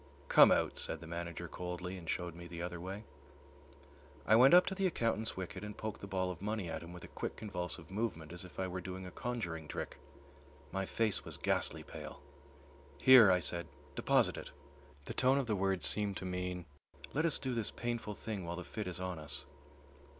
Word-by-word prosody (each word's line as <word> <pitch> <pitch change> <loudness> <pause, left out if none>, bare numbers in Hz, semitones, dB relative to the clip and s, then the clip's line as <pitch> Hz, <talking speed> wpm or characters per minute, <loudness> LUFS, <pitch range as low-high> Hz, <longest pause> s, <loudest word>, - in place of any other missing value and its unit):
"Come - - +9
out," - - +2
said 80 - +1
the 85 - -10
manager 85 +1 -5
coldly, 90 +2 -5
and 85 -3 -8
showed 90 -2 -1
me 85 +1 -9
the 85 0 -7
other 90 -1 -4
way. 95 +4 -5 1.2
I 110 - +6
went 130 +8 +8
up 180 - +8
to 195 - -1
the 190 0 +2
accountant's 115 - 0
wicket 95 +2 -5
and 105 0 -6
poked 110 -1 -4
the 100 - -6
ball 95 -1 0
of 90 - -8
money 105 -4 -2
at 80 - -3
him 85 +1 -9
with 90 0 -9
a - - -8
quick - - -4
convulsive 90 -4 -5
movement 95 -7 -2
as 90 - -5
if 90 0 -11
I 95 - 0
were 90 0 -4
doing 95 +1 -6
a 90 - -7
conjuring 85 -11 -3
trick. - - -5 0.7
My 95 -1 -2
face 110 -3 +1
was - - -5
ghastly - - +1
pale. - - -8 0.8
"Here," 125 - +9
I 90 -1 +4
said, 85 +2 -1 0.3
"deposit - - +3
it." - - -6 0.6
The - - -3
tone 130 +1 +4
of 140 - +1
the 110 -2 0
words 95 -3 +1
seemed 105 -2 +2
to - - -4
mean, 90 -1 -3 0.5
"Let 150 - +2
us 165 -2 +3
do 130 -2 -2
this 115 -3 0
painful 115 -3 -3
thing 105 -3 -4
while 85 0 -3
the 90 - -5
fit 105 +3 -5
is 90 0 -3
on 90 -3 -3
us." 75 -1 -3
95 Hz, 210 wpm, -35 LUFS, 85-110 Hz, 1.2 s, Come